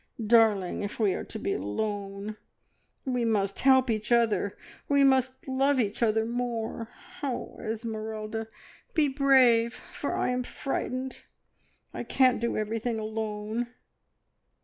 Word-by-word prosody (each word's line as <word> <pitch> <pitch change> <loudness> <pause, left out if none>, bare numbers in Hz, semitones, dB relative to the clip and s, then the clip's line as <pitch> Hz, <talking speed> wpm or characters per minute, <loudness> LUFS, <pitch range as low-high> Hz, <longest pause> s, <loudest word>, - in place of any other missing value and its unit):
Darling, 215 -5 +4
if 205 0 -4
we 210 -5 +2
are - - -3
to - - -7
be 200 - -1
alone, 200 - -3 0.7
we 250 -2 0
must 205 -4 0
help 260 -1 +5
each 215 -1 -2
other, 215 -4 +2 0.3
we 280 -1 +5
must 260 -1 +2
love 270 +1 +2
each 215 -1 -1
other 220 -1 +3
more! 230 -1 -3 0.3
Oh, 265 -4 -4
Esmeralda, 220 -1 -4 0.5
be 310 -3 +4
brave, 260 -4 +4 0.2
for - - -2
I - - 0
am 250 0 0
frightened 255 0 -4 0.7
I - - -4
can't 255 -3 +3
do 235 - 0
everything 225 +2 -1
alone!" 215 +1 -3
230 Hz, 125 wpm, -28 LUFS, 215-255 Hz, 0.7 s, help